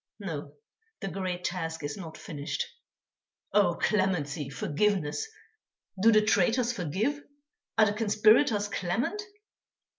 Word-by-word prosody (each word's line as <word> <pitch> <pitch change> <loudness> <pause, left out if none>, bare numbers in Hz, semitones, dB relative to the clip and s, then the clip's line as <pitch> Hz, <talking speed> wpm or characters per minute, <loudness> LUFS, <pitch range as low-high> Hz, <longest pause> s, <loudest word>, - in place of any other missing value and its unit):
No, - - -5 0.5
the 195 - -2
great 185 -2 -3
task 165 -3 -3
is 145 0 -3
not 165 -5 -8
finished. 145 -1 -4 0.9
Oh! 200 -4 +4
clemency, 165 -10 0
forgiveness! 150 - 0 0.7
Do 225 +3 +7
the 215 -1 +5
traitors 230 +4 +3
forgive? 220 - -1 0.6
Are 215 - +7
the 205 - +1
conspirators 215 +1 +4
clement? 205 - -1
195 Hz, 110 wpm, -29 LUFS, 165-215 Hz, 0.9 s, Do